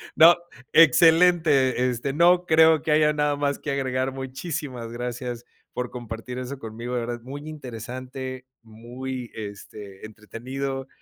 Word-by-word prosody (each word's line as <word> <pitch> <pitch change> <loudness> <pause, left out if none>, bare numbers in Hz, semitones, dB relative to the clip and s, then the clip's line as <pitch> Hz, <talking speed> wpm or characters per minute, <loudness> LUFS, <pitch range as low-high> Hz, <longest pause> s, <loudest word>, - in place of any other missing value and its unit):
No, 170 +2 +8 0.4
excelente, 160 -5 +5
este, 125 +3 -3
no 175 +4 +4
creo 160 0 +5
que 155 - -2
haya 150 0 +4
nada 150 -1 +1
más 145 0 -1
que 150 - -6
agregar. 130 -1 -1
Muchísimas 130 -2 -5
gracias 120 0 -5 0.3
por 125 -1 -4
compartir 120 +1 -7
eso 130 +2 -6
conmigo, 115 +2 -6
de 120 - 0
verdad. 120 0 -5
Muy 140 +4 -8
interesante, 130 -1 -7 0.2
muy, 120 +3 -7
este, 100 -1 -9
entretenido 130 +5 -6
130 Hz, 130 wpm, -24 LUFS, 120-145 Hz, 0.4 s, No